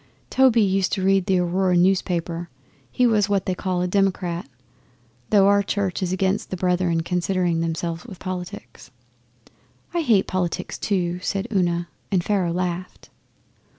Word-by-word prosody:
Toby 250 -4 +5
used 195 -1 +1
to 190 -2 -1
read 195 -1 +3
the 190 - +3
Aurora 180 +1 +1
newspaper. 175 -2 0 0.4
He 250 - +1
was 215 -4 +3
what 200 -2 +1
they 185 - 0
call 180 -1 -2
a - - 0
"Democrat," 180 -4 0 0.8
though 195 -2 +5
our 200 0 +5
Church 200 -2 -2
is 180 -1 -1
against 190 +3 0
the 185 - -4
Brethren 180 -2 +1
concerning 180 -1 0
themselves 165 +1 -3
with 195 -6 -9
politics.' 180 -1 -7 1.0
'I 345 - +1
hate 225 -10 +3
politics, 180 -2 -2
too,' 180 -3 -1
said 195 +3 -2
Una, 175 -2 +1 0.2
and 185 -3 +2
Pharaoh 190 -4 0
laughed. 180 +1 -4
185 Hz, 150 wpm, -23 LUFS, 175-195 Hz, 1.0 s, Toby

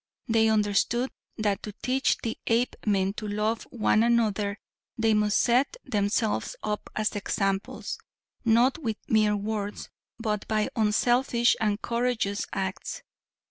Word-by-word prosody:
They 225 -1 +4
understood 220 +4 +1 0.3
that 205 -3 0
to 210 - -7
teach 265 +2 +2
the 225 -1 -2
Apemen 210 -4 +1
to 215 - -4
love 210 +2 -1
one 220 -2 +2
another 215 -3 +2 0.4
they 225 -1 +3
must 210 0 +2
set 255 - +2
themselves 215 - 0
up 210 0 -3
as 215 0 0
examples, 195 -1 -2 0.4
not 240 +5 +4
with 225 -8 -2
mere 215 -1 +3
words, 205 0 -4 0.3
but 215 -3 -2
by 215 -1 +1
unselfish 240 +3 +3
and 210 -1 +1
courageous 235 -4 0
acts. 190 -1 -4
220 Hz, 125 wpm, -27 LUFS, 205-235 Hz, 0.4 s, They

